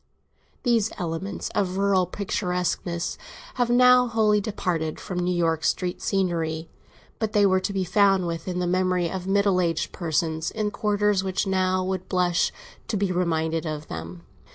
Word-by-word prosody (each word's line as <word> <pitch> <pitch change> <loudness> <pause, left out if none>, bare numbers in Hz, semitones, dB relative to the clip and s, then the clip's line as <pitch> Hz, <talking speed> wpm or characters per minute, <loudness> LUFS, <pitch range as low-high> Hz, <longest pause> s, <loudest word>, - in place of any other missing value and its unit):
These 230 -4 +2
elements 180 +3 -4
of 190 -2 -1
rural 195 -2 +2
picturesqueness 180 -3 -2 0.4
have 240 - +2
now 250 +1 +6
wholly 215 -2 +2
departed 180 -7 -2
from 180 -2 -4
New 180 0 0
York 165 -2 +1
street 180 +3 -1
scenery; 165 -4 -1 0.5
but 220 -2 -2
they 205 -1 +5
were 190 -1 +4
to 195 - -3
be 195 -1 -1
found 195 0 +3
within 170 +2 -3
the 180 - 0
memory 180 -1 +1
of 185 -1 -5
middle 200 -1 +3
aged 165 -2 -1
persons, 160 -1 -1
in 215 -1 -2
quarters 205 -2 +1
which 190 +1 -1
now 185 -1 +1
would 185 0 -3
blush 180 -2 +2 0.4
to 215 - -1
be 195 -1 0
reminded 165 -2 0
of 155 0 -5
them. 85 +2 -7
185 Hz, 155 wpm, -25 LUFS, 170-200 Hz, 0.5 s, now